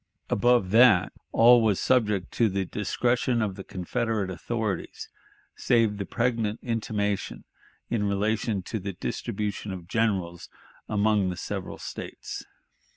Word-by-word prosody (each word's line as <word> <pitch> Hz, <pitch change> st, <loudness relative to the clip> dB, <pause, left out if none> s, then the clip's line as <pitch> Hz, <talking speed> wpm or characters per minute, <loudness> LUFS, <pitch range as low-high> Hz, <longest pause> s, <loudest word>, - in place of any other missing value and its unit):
Above 120 Hz, -3 st, +3 dB
that, 110 Hz, -4 st, +6 dB, 0.2 s
all 120 Hz, +1 st, +7 dB
was 105 Hz, -4 st, +2 dB
subject 105 Hz, -7 st, +1 dB
to 115 Hz, -2 st, +2 dB
the 95 Hz, 0 st, -1 dB
discretion 120 Hz, +6 st, 0 dB
of 105 Hz, -4 st, 0 dB
the 95 Hz, 0 st, -8 dB
Confederate 105 Hz, +2 st, -2 dB
authorities, 110 Hz, +3 st, -4 dB, 0.5 s
save 115 Hz, -4 st, +2 dB
the 100 Hz, -, -4 dB
pregnant 115 Hz, -3 st, 0 dB
intimation 105 Hz, -4 st, -2 dB, 0.4 s
in 110 Hz, -3 st, 0 dB
relation 105 Hz, 0 st, 0 dB
to 110 Hz, -, -4 dB
the 100 Hz, +1 st, -5 dB
distribution 100 Hz, +3 st, -4 dB
of 90 Hz, -2 st, -7 dB
generals 95 Hz, -5 st, -1 dB, 0.4 s
among 105 Hz, -2 st, +2 dB
the 90 Hz, -, -4 dB
several -, -, -5 dB
States. -, -, -7 dB
105 Hz, 125 wpm, -27 LUFS, 95-115 Hz, 0.5 s, all